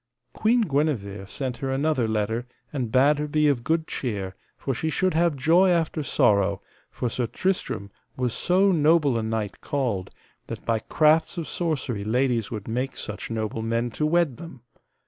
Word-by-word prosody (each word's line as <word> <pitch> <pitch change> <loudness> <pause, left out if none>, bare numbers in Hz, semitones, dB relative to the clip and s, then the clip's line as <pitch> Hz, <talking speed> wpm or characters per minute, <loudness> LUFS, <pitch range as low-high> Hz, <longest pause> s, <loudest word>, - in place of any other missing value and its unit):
Queen 235 +3 +3
Guenever 135 - -1
sent 125 +2 -4
her 135 - -3
another 135 -2 +1
letter, 110 +2 -1 0.3
and 125 -6 -2
bade 140 +4 +4
her 150 - -1
be 150 0 +2
of 135 -5 +1
good 160 +2 +1
cheer, 100 -11 -4 0.2
for 135 - -2
she 160 +6 -2
should 185 +4 +1
have 165 -1 +2
joy 165 +7 +4
after 165 -2 +1
sorrow, 100 -7 +2 0.3
for 125 - -3
Sir 120 +1 -1
Tristram 180 - -2 0.3
was 125 -2 0
so 190 +2 +3
noble 155 -4 +4
a 115 - 0
knight 110 -2 -3
called, 120 -10 -2 0.4
that - - -7
by 115 -1 +1
crafts 155 - +2
of 165 - -3
sorcery 140 - -2
ladies 120 0 +1
would 105 -3 -6
make 125 +4 -2
such 105 - -5
noble 110 0 -3
men 115 +2 -1
to 150 +6 0
wed 170 -5 +2
them. 165 -7 -10
130 Hz, 170 wpm, -25 LUFS, 110-155 Hz, 0.4 s, bade